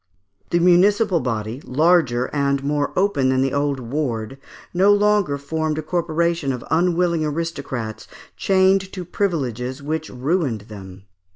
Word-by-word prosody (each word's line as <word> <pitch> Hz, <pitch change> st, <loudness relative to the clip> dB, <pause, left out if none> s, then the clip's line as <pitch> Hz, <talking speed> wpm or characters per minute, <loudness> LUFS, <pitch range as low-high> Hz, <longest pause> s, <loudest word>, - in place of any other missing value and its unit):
The 175 Hz, -, +2 dB
municipal 180 Hz, +2 st, +4 dB
body, 115 Hz, -1 st, -3 dB
larger, 140 Hz, -4 st, +2 dB, 0.4 s
more 145 Hz, 0 st, 0 dB
open 180 Hz, -9 st, +2 dB
than 130 Hz, 0 st, +2 dB
the 135 Hz, -, -1 dB
old 140 Hz, -1 st, 0 dB
"ward," 125 Hz, -1 st, -3 dB, 0.3 s
no 190 Hz, +3 st, +4 dB
longer 205 Hz, -7 st, +2 dB
formed 155 Hz, +2 st, -2 dB
a 155 Hz, -, -3 dB
corporation 170 Hz, -2 st, 0 dB
of 125 Hz, -2 st, -5 dB
unwilling 170 Hz, 0 st, +2 dB
aristocrats 145 Hz, -8 st, -4 dB, 0.3 s
enchained 190 Hz, 0 st, +2 dB
to 185 Hz, -2 st, -6 dB
privileges 135 Hz, -, -2 dB
which 160 Hz, +2 st, -3 dB
ruined 135 Hz, -, -1 dB
them. 100 Hz, -3 st, -11 dB
155 Hz, 125 wpm, -21 LUFS, 130-175 Hz, 0.4 s, municipal